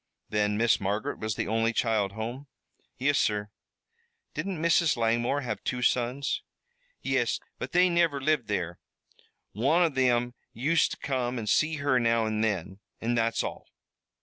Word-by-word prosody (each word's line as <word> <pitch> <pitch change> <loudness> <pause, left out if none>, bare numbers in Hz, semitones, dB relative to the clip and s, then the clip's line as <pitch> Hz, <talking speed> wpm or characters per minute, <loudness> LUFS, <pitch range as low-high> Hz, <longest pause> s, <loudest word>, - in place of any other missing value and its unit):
"Then 105 -1 +1
Miss 115 0 +3
Margaret 100 +2 -2
was 110 -2 -2
the - - -2
only 115 +1 +1
child 110 -4 +1
home?" 120 +6 -5 0.5
"Yis, 140 +2 +2
sur." 105 -1 0 0.8
"Didn't 175 +2 -3
Mrs. 165 -2 +3
Langmore 120 +4 +1
have 110 -6 -4
two 125 -1 -2
sons?" 125 +3 0 0.6
"Yis, - - +1 0.2
but - - -5
they 180 +1 +5
niver 170 -5 +2
lived 140 -3 +1
there. 85 -4 -2 0.7
One 140 - +3
av 165 -4 +1
thim 125 -2 +2 0.2
used 150 +8 +2
to - - -6
come 130 -2 -2
an' 115 - -4
see 155 +8 +2
her 140 -3 +2
now 115 -1 +2
an' 110 0 -1
thin, 95 -3 -1 0.2
an' 115 +2 -1
that's 115 -1 +1
all." - - -6
120 Hz, 155 wpm, -28 LUFS, 110-140 Hz, 0.8 s, they